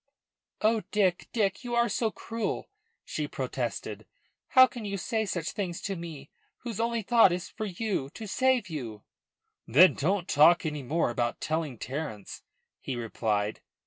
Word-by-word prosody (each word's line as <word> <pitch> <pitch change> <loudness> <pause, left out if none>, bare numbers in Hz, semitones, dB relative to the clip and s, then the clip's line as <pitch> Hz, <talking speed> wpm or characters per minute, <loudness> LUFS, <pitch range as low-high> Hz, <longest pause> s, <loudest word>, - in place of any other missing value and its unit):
"Oh, 220 0 +3
Dick, 190 -4 +1
Dick, 205 -1 0
you 240 -1 -2
are 235 0 +4
so 230 -1 0
cruel!" 230 +1 -4 0.3
she - - -3
protested. - - -4 0.4
"How 260 -1 +8
can 245 -3 -8
you 200 -1 -3
say 220 +3 -1
such 175 -1 -2
things 185 -6 -3
to 195 - -3
me, 160 -5 -8 0.3
whose 230 -4 -5
only 230 -1 0
thought 230 -3 +6
is 175 0 -3
for 215 - -5
you, 195 -7 -2
to 225 - -6
save 255 +1 +2
you." 120 - -6 0.6
"Then 165 +11 +7
don't 180 +4 0
talk 165 +4 +5
any 150 -2 -2
more 145 +1 0
about 120 0 -1
telling 155 -5 -2
Terence," 115 -4 -5 0.4
he 130 - -4
replied. 110 -3 -1
180 Hz, 155 wpm, -29 LUFS, 145-220 Hz, 0.6 s, How